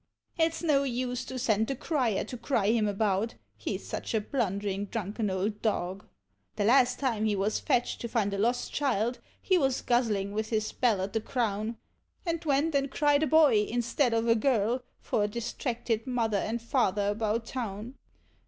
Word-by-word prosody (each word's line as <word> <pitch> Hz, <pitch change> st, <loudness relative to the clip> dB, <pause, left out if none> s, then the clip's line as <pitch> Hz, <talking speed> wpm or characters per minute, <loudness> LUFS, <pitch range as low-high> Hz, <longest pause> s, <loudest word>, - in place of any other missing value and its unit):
— -, -, -32 dB
It's 325 Hz, +1 st, -3 dB
no 295 Hz, -4 st, +3 dB
use 250 Hz, -1 st, -2 dB
to 260 Hz, -, -6 dB
send 220 Hz, -3 st, +1 dB
the 270 Hz, -, -2 dB
Crier 255 Hz, -, 0 dB
to -, -, -7 dB
cry 230 Hz, -4 st, +1 dB
him 225 Hz, -2 st, +2 dB
about, 205 Hz, +1 st, 0 dB, 0.2 s
he -, -, -3 dB
's -, -, -14 dB
such -, -, -3 dB
a -, -, +3 dB
blunderiu' 200 Hz, -4 st, -2 dB
drunken 210 Hz, 0 st, -2 dB
old 200 Hz, +3 st, -2 dB
dog; 195 Hz, -2 st, -2 dB, 0.5 s
The 205 Hz, -, 0 dB
last 250 Hz, +1 st, +5 dB
time 230 Hz, -6 st, 0 dB
he 210 Hz, -1 st, +2 dB
was 200 Hz, +2 st, 0 dB
fetched 250 Hz, -5 st, 0 dB
to 235 Hz, -, -4 dB
nnd 210 Hz, -4 st, 0 dB
a 200 Hz, -, -2 dB
lost 240 Hz, +4 st, 0 dB
child 245 Hz, -4 st, 0 dB, 0.2 s
he 370 Hz, -2 st, +2 dB
was 270 Hz, -4 st, +1 dB
guzzling 215 Hz, -5 st, +1 dB
with 215 Hz, +1 st, -2 dB
his 215 Hz, -1 st, 0 dB
bell 225 Hz, -7 st, +1 dB
at 195 Hz, +1 st, -3 dB
the 225 Hz, -, 0 dB
Crown, 220 Hz, -1 st, -2 dB, 0.5 s
And 335 Hz, -1 st, -2 dB
went 300 Hz, +1 st, +1 dB
and 275 Hz, 0 st, +1 dB
cried 290 Hz, +1 st, +3 dB
a 310 Hz, -, +2 dB
boy 285 Hz, -7 st, +5 dB
instead 240 Hz, +1 st, +1 dB
of 225 Hz, +1 st, +1 dB
a 230 Hz, -, +6 dB
girl, 230 Hz, 0 st, +1 dB, 0.2 s
for 210 Hz, -, 0 dB
a -, -, 0 dB
distracted 235 Hz, +1 st, -3 dB
Mother 230 Hz, -4 st, +1 dB
and 225 Hz, +4 st, -2 dB
Father 210 Hz, -5 st, +1 dB
about 220 Hz, +2 st, -1 dB
Town. 230 Hz, -1 st, -5 dB
230 Hz, 190 wpm, -29 LUFS, 210-255 Hz, 0.5 s, a